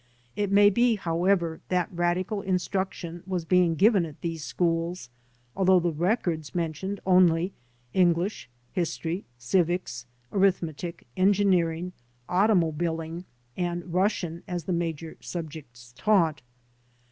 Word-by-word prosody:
It 205 -2 -1
may 205 +1 +6
be, 235 +2 +3
however, 170 -2 0
that 180 -2 0
radical 175 +3 0
instruction 185 -2 -2
was 180 -3 -2
being 180 -1 +3
given 200 +2 +4
at 155 -2 -8
these 165 -2 -4
schools 165 -5 -1 0.4
al 195 - 0
though 185 0 +6
the 175 0 0
records 170 -2 -1
mentioned 175 +4 -2
only 180 -1 +4 0.4
English, 175 - +1 0.2
history, 175 +1 -2
civics, 125 -2 0 0.2
arithmetic, 175 -4 0
engineering, 180 -3 +2 0.3
automobiling 170 -3 +1 0.3
and 175 -1 -3
Rus 195 +4 +3
sian 170 -1 -5
as 175 -3 -3
the 180 - -2
major 165 -2 -3
subjects 145 -8 -8
taught. 165 - +2
175 Hz, 115 wpm, -27 LUFS, 165-190 Hz, 0.4 s, may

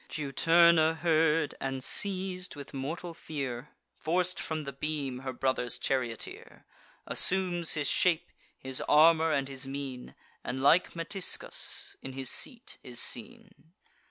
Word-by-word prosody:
Juturna 165 +2 +4
heard, 160 -2 +2
and, 135 -1 -3
seiz'd 185 -1 0
with 140 0 -10
mortal 160 +6 -5
fear, 140 -5 -5 0.2
Forc'd 180 +2 -1
from 155 -1 -3
the 140 -1 -6
beam 140 -2 -3
her 130 0 -5
brother's 130 -1 -1
charioteer; 125 -4 -4 0.4
Assumes 180 -3 +2
his 145 -2 -1
shape, 170 -3 +2 0.3
his 130 0 -3
armour, 160 +1 +6
and 140 -3 0
his 135 -1 -6
mien, 135 -2 -6 0.3
And, 130 +1 -4
like 175 +6 +4
Metiscus, 175 +3 -1
in 135 - -7
his 130 -1 -2
seat 250 -1 -3
is 125 -1 -8
seen. 215 -8 -4
155 Hz, 130 wpm, -30 LUFS, 135-170 Hz, 0.4 s, armour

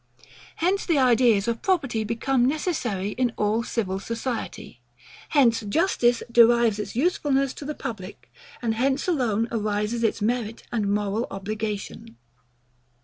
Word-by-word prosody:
Hence 370 +4 +1
the 330 -4 +1
ideas 240 -5 +4
of 230 -1 -1
property 275 - 0
become 240 +3 +1
necessary 260 - -1
in 245 +2 -1
all 210 +2 +1
civil 195 -5 -2
society: 230 +3 -5 0.5
Hence 245 -6 +4
justice 240 - +1
derives 235 -2 +5
its 210 - -5
usefulness 275 -2 +1
to 290 - -9
the 300 +1 -4
public: 205 -4 -8 0.3
And 225 -2 +1
hence 265 +7 0
alone 235 - +1
arises 215 +1 -1
its 225 - +1
merit 225 0 -2
and 210 -4 0
moral 205 +3 -1
obligation. 200 - -5
230 Hz, 130 wpm, -25 LUFS, 210-265 Hz, 0.5 s, derives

